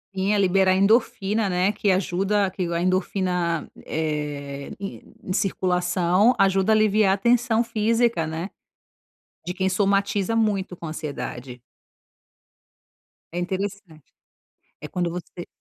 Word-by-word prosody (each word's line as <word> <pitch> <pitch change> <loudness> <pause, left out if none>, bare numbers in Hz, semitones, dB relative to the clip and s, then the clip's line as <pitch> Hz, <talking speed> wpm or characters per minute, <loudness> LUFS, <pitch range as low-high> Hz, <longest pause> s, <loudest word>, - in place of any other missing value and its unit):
Sim, 190 +2 +1
a - - +2
liberar 190 -1 +3
endorfina, 205 0 +2
né, 180 +2 +2
que 205 -1 +1
ajuda 195 +2 +1
que 185 0 -3
a 170 0 -1
endorfina, 180 -2 0 0.2
eh, 145 -3 -4
em 195 -1 -7
circulação 180 +2 +2
ajuda 195 +1 +3
a - - +5
aliviar 215 -2 +3
a - - 0
tensão 235 +2 +2
física, 230 -4 +1
né, 160 +4 -4 1.0
de 180 - -3
quem 190 0 0
somatiza 200 +2 +1
muito 200 -5 0
com 170 - -8
ansiedade. 135 -5 -6 1.7
É - - -1
interessante. 190 -3 -5 0.7
É - - -7
quando 175 -1 -2
você 175 0 -7
190 Hz, 120 wpm, -24 LUFS, 175-205 Hz, 1.7 s, a